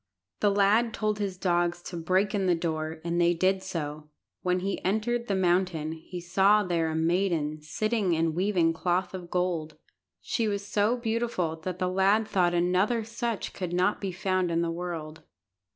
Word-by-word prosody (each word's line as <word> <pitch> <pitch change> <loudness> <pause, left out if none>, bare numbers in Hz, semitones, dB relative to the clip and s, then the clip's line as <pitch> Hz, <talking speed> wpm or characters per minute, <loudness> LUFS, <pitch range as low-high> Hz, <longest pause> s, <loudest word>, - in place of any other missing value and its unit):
The 205 - +3
lad 205 +3 +3
told 215 -1 -1
his 195 -3 -2
dogs 175 -1 +1
to 180 - -7
break 185 +4 +1
in 195 -2 0
the 175 - +4
door, 160 -1 -3
and 170 +1 0
they 175 0 +3
did 190 +3 +2
so. 150 -3 -5 0.3
When 180 0 0
he 195 +1 -3
entered 235 +5 0
the 200 - 0
mountain 175 -4 +1
he 165 +3 -7
saw 195 +4 +3
there 170 -3 0
a 160 - -3
maiden, 160 -2 0
sitting 200 +4 0
and 165 0 +1
weaving 175 -2 +2
cloth 175 +3 -1
of 180 -2 -7
gold. 170 -4 -1 0.4
She 230 -2 -1
was 200 -1 -2
so 210 +4 +1
beautiful 225 -8 -1
that 180 +2 -5
the 185 - 0
lad 195 +4 +2
thought 180 -4 +2
another 185 +7 +2
such 230 0 -3
could 180 -2 -4
not 180 +4 +1
be 195 -2 -2
found 185 -1 0
in 170 0 +1
the 165 - -1
world. 165 -2 -5
180 Hz, 180 wpm, -28 LUFS, 170-200 Hz, 0.4 s, the